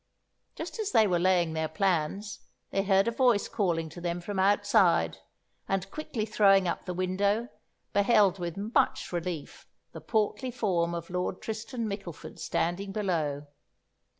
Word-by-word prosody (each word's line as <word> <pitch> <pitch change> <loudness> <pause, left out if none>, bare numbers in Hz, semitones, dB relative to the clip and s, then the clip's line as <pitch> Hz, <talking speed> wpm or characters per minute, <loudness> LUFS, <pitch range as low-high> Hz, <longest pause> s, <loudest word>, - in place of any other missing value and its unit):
Just - - -6
as 425 -2 -1
they 220 - +6
were 180 -4 +1
laying 175 -2 +2
their 160 0 -1
plans, 195 +3 -1 0.3
they 195 - +1
heard 195 +1 +3
a - - +2
voice 240 -3 +3
calling 170 -5 0
to 175 +3 -10
them 175 0 -2
from 195 +2 -4
outside, 200 +2 +3 0.5
and 195 0 -1
quickly 275 -8 -3
throwing 195 -3 +4
up 170 - -3
the 180 - -3
window, 200 +6 0 0.4
beheld 200 -2 +4
with 175 0 -4
much 210 +4 0
relief 170 -3 -5 0.2
the - - -9
portly 220 +4 0
form 180 -8 0
of 170 +1 -6
Lord 180 +1 -2
Tristan 225 +2 -4
Mickleford 195 -5 -7
standing 190 +4 -1
below. 160 -8 -1
195 Hz, 150 wpm, -29 LUFS, 175-210 Hz, 0.5 s, they